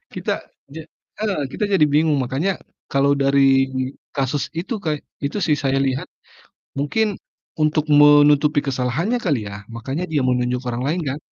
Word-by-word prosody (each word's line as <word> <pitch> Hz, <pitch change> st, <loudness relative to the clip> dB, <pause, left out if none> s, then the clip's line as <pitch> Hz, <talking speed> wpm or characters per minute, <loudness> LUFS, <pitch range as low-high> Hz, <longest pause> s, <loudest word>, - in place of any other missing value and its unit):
Kita -, -, -3 dB, 0.4 s
ja 160 Hz, -, -6 dB, 0.4 s
heeh, 205 Hz, -8 st, -1 dB
kita -, -, -2 dB
jadi 185 Hz, -6 st, +5 dB
bingung 150 Hz, 0 st, +2 dB
makanya, 140 Hz, +10 st, -1 dB, 0.4 s
kalau 140 Hz, +1 st, +3 dB
dari 140 Hz, 0 st, +3 dB, 0.8 s
kasus 135 Hz, +1 st, 0 dB
itu 200 Hz, +8 st, -3 dB
kay 155 Hz, -1 st, 0 dB, 0.3 s
itu 145 Hz, -, -2 dB
sih 150 Hz, -3 st, +3 dB
saya 135 Hz, 0 st, +2 dB
lihat, 130 Hz, 0 st, -2 dB, 0.7 s
mungkin, 145 Hz, +11 st, +1 dB, 0.5 s
untuk 155 Hz, 0 st, +1 dB
menutupi 145 Hz, 0 st, +6 dB
kesalahannya 135 Hz, -, -1 dB
kali 140 Hz, -, -1 dB
ya 100 Hz, +1 st, -9 dB
makanya 135 Hz, +9 st, -4 dB
dia 150 Hz, -, +2 dB
menunjuk 125 Hz, 0 st, 0 dB
orang 120 Hz, 0 st, -3 dB
lain 160 Hz, +6 st, 0 dB
kan? 135 Hz, -, -3 dB
145 Hz, 150 wpm, -21 LUFS, 135-155 Hz, 0.8 s, menutupi